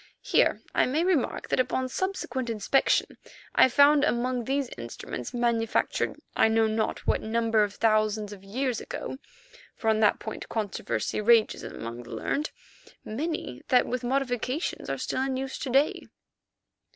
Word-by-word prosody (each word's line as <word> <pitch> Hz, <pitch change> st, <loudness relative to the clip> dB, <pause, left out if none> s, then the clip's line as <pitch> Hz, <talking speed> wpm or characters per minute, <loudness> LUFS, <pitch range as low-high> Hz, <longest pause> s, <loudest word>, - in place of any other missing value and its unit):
Here -, -, +2 dB
I -, -, +3 dB
may 300 Hz, +6 st, +1 dB
remark, 350 Hz, -8 st, 0 dB
that -, -, +1 dB
upon 255 Hz, 0 st, 0 dB
subsequent 260 Hz, -6 st, -3 dB
inspection 230 Hz, +5 st, +1 dB, 0.4 s
I -, -, +6 dB
found 285 Hz, +3 st, +6 dB
among 250 Hz, -3 st, 0 dB
these 275 Hz, +1 st, 0 dB
instruments, 120 Hz, 0 st, -6 dB
manufactured 235 Hz, -2 st, 0 dB, 0.2 s
I -, -, +5 dB
know 225 Hz, 0 st, +3 dB
not 220 Hz, 0 st, -1 dB
what -, -, +1 dB
number 225 Hz, 0 st, +1 dB
of 205 Hz, 0 st, -3 dB
thousands 215 Hz, -1 st, +1 dB
of 195 Hz, -1 st, -12 dB
years 245 Hz, +4 st, -2 dB
ago—for -, -, -9 dB
on 220 Hz, -1 st, +4 dB
that 215 Hz, -1 st, +4 dB
point 220 Hz, -, -7 dB
controversy 210 Hz, -1 st, -2 dB
rages 225 Hz, 0 st, +4 dB
among 115 Hz, +1 st, -7 dB
the 120 Hz, 0 st, -8 dB
learned—many 295 Hz, -, -5 dB
that 250 Hz, -, +4 dB
with 250 Hz, -1 st, -3 dB
modifications 255 Hz, +3 st, -1 dB
are -, -, -1 dB
still -, -, -2 dB
in 265 Hz, -1 st, -1 dB
use 270 Hz, 0 st, -4 dB
to 270 Hz, -, -4 dB
day. 275 Hz, +4 st, +2 dB
240 Hz, 145 wpm, -27 LUFS, 220-270 Hz, 0.4 s, I